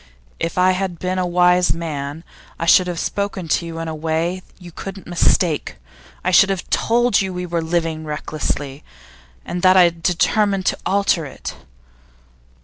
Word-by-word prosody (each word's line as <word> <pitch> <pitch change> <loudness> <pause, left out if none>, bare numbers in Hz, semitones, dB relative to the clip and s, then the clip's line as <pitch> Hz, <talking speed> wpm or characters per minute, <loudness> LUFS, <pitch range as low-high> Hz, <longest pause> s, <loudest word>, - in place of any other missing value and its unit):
If 165 - -3
I 185 +1 +5
had 185 -1 -2
been 185 +2 -2
a 180 - 0
wise 180 0 +3
man, 150 -2 -5 0.3
I 165 - -3
should 180 +2 +5
have 175 -1 -3
spoken 200 -1 -3
to 170 - +1
you 165 0 -7
in 165 0 -4
a 160 - -3
way 165 +3 -2 0.2
you 180 -2 -12
couldn't 195 +3 -8
mistake. 175 - +1 0.5
I 185 - +1
should 195 +2 +6
have 190 -2 -2
told 240 -2 +2
you 190 - -2
that 185 - -7
we 180 0 -3
were 170 -1 -2
living 165 -1 -1
recklessly, 150 -2 -4 0.6
and 175 0 -4
that 185 0 +5
I 185 - +8
had 170 -1 +1
determined 195 +2 +1
to - - +1
alter 195 -4 +1
it. - - -7
175 Hz, 175 wpm, -20 LUFS, 165-185 Hz, 0.6 s, I